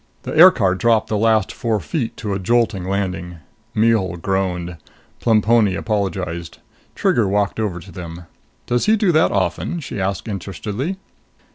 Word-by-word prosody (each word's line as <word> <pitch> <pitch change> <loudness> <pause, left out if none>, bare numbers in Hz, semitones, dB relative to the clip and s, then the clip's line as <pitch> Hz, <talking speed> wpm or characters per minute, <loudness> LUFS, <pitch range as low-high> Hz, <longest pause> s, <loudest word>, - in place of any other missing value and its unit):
The - - -5
aircar 155 - +6
dropped 110 +3 +2
the 110 - 0
last 110 -1 +2
four 115 -3 -1
feet 125 - -3
to 105 -3 -3
a 95 - -2
jolting 110 -2 +1
landing. 90 -3 -3 0.4
Mihul 110 -5 +2
groaned. 90 -1 -2 0.4
Plemponi 110 -3 +3
apologized. 95 -6 -3 0.4
Trigger 115 -4 +2
walked 100 +2 0
over 100 -5 -2
to 95 +2 -13
them. 85 0 -8 0.4
"Does 120 - 0
he 220 - +5
do 205 -4 +2
that 155 -1 +3
often?" 175 - -1
she 135 -9 -5
asked 95 +3 -2
interestedly. 105 - -4
100 Hz, 145 wpm, -20 LUFS, 95-115 Hz, 0.4 s, aircar